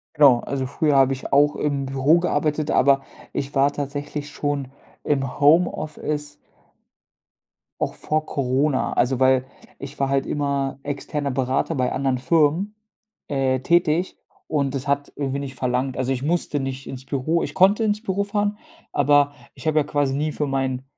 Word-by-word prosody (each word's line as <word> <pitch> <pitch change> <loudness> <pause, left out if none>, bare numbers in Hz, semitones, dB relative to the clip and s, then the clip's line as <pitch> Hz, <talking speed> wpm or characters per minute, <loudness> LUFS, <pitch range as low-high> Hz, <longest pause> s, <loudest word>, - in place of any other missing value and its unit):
Genau, 135 -5 +6
also 135 -2 -3
früher 145 +1 +1
habe 135 0 +5
ich 130 - -6
auch 145 +1 +4
im 140 -2 -1
Büro 135 +5 +3
gearbeitet, 155 -3 0
aber 135 +1 +4 0.3
ich 140 +1 -4
war 140 +1 +4
tatsächlich 145 +1 -5
schon 145 -3 -2 0.4
im 135 -2 -1
Homeoffice 150 -1 +1 1.4
auch - - -1
vor 155 0 -1
Corona. 135 +1 0
Also 125 +1 +1
weil, 130 0 +4 0.3
ich 140 +1 -9
war 135 -1 +1
halt 135 0 +1
immer 140 -2 -1
externer 145 0 -3
Berater 130 +5 0
bei 125 -2 0
anderen 135 -2 0
Firmen, 165 +8 +1 0.5
äh, 135 -2 0
tätig 170 +2 +2 0.3
und 140 -3 -1
das 135 +1 -4
hat 140 0 0
irgendwie 140 -1 -2
nicht 135 -2 -6
verlangt 125 +1 -1
also, 130 0 -1
ich 130 0 -2
musste 155 -2 0
nicht 135 0 -5
ins 130 0 -8
Büro, 150 +5 0
ich 150 - -4
konnte 200 +6 +4
ins 210 +1 0
Büro 200 -1 0
fahren, 205 0 -1 0.3
aber 145 0 +3 0.2
ich - - -12
habe 155 0 +3
ja - - +2
quasi 145 -2 0
nie 150 +1 -1
für 150 - -1
meinen 130 -1 -1
140 Hz, 165 wpm, -23 LUFS, 135-150 Hz, 1.4 s, Genau